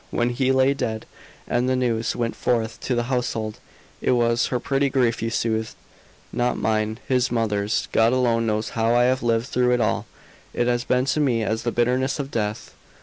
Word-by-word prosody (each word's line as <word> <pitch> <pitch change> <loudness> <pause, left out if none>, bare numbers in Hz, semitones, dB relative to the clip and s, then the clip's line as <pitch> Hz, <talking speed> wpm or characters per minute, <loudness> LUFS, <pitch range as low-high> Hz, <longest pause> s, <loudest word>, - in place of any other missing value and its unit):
When 120 0 0
he 130 +2 +1
lay 130 +1 +4
dead, 110 -5 -3 0.4
and 125 +1 +1
the 130 - +2
news 115 -3 0
went 115 -1 -2
forth 115 -2 -1
to 125 - -2
the 120 - +1
household, 120 -4 -2 0.4
it - - +2
was 120 -1 +2
her 125 - -1
petty 135 +2 0
grief 125 -3 +1
you 115 - -1
soothed, 110 -1 -1 0.6
not 120 0 0
mine, 110 0 0
his 125 -1 +2
mother's. 105 -3 0
God 115 +1 +4
alone 120 -3 +1
knows 110 0 -1
how 115 +1 +1
I 120 - +5
have 130 +1 +2
lived 115 -1 +1
through 125 -1 +1
it 125 - +2
all; 110 - 0 0.5
it 120 - +1
has 120 0 0
been 125 0 +1
to 145 - 0
me 125 -6 +1
as 110 +1 -1
the 120 - -1
bitterness 125 +3 +1
of 140 -1 -5
death." 105 -1 -3
120 Hz, 200 wpm, -23 LUFS, 115-125 Hz, 0.6 s, I